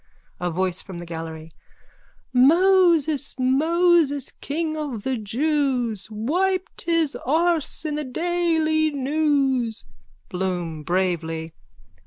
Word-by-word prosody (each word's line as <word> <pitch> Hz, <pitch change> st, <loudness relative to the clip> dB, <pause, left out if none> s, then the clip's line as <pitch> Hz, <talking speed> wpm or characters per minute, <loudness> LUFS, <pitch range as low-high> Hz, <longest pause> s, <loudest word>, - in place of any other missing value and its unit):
A 180 Hz, -, -1 dB
VOICE 185 Hz, +1 st, -1 dB
FROM 190 Hz, -3 st, -9 dB
THE 175 Hz, -, -7 dB
GALLERY: 160 Hz, -1 st, -7 dB, 0.8 s
Moses, 320 Hz, 0 st, +4 dB
Moses, 300 Hz, +2 st, +2 dB
king 315 Hz, +2 st, -3 dB
of 280 Hz, -9 st, -4 dB
the 265 Hz, 0 st, -1 dB
jews, 245 Hz, -2 st, -1 dB
Wiped 355 Hz, -, -1 dB
his 330 Hz, -4 st, +1 dB
arse 325 Hz, +2 st, 0 dB
in 305 Hz, -, -2 dB
the 300 Hz, +1 st, -2 dB
Daily 320 Hz, +1 st, +1 dB
News. 275 Hz, -5 st, 0 dB, 0.4 s
BLOOM: 180 Hz, -4 st, -3 dB
_(Bravely.) 165 Hz, -3 st, -1 dB
275 Hz, 100 wpm, -23 LUFS, 190-320 Hz, 0.8 s, Moses